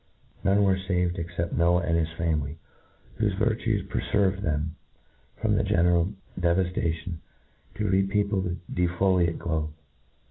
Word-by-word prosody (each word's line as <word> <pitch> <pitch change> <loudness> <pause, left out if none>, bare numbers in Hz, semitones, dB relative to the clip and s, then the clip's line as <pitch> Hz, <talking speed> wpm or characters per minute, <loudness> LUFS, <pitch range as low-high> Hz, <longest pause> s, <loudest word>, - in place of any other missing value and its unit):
None 100 +1 +4
were 95 -1 +3
faved 90 -2 0
except 85 0 -3
Noah 85 +1 +3
and 80 -1 +1
his 80 -1 +1
family, 80 -2 -1 0.6
whofe 105 -4 +1
virtues 110 -2 0
preferved 100 -1 +1
them 80 -2 -1 0.6
from 110 -1 +1
the 110 - +2
general 90 -2 +3 0.3
devaftation, 85 -1 0 0.6
to 105 0 -1
repeople 100 +1 +2
the 90 -1 -2 0.2
de 90 0 +2
folate 90 -1 +2
globe. 80 -2 -2
90 Hz, 130 wpm, -27 LUFS, 85-100 Hz, 0.6 s, None